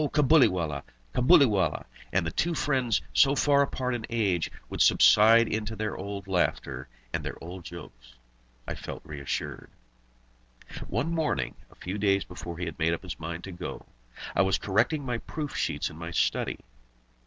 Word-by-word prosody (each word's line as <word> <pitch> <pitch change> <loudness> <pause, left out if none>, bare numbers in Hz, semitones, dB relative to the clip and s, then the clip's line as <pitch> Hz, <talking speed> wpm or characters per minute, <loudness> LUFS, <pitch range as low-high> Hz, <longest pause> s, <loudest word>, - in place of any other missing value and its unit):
Cabuliwallah! 110 - +3 0.3
Cabuliwallah!" 120 - +4 0.3
and 95 -2 +1
the 80 - -2
two 170 - 0
friends, 130 -8 +1
so 140 0 +5
far 140 0 +4
apart 130 -2 -1
in 120 -2 -3
age, 100 -8 0 0.2
would - - -3
subside 115 +2 +6
into 110 0 -3
their 110 -1 -3
old 100 0 -6
laughter 70 -8 -1 0.3
and - - -1
their - - -4
old 90 +2 -8
jokes, - - -11 0.5
I - - -2
felt - - -8
reassured. 70 -2 -5 1.2
One 130 - -1
morning, 160 -3 0 0.2
a - - -20
few 95 +3 -5
days 100 -1 +2
before 85 -1 -8
he 90 - -3
had 80 -2 -7
made 80 +1 +2
up 85 - -4
his 90 - -7
mind 85 +1 -5
to 95 - -7
go, 90 0 -7 0.5
I - - +4
was 95 0 +3
correcting 125 +9 +1
my 120 -2 -2
proof 150 +2 -5
sheets - - -1
in 75 - -12
my 85 0 -5
study. 85 - 0
100 Hz, 165 wpm, -28 LUFS, 85-125 Hz, 1.2 s, subside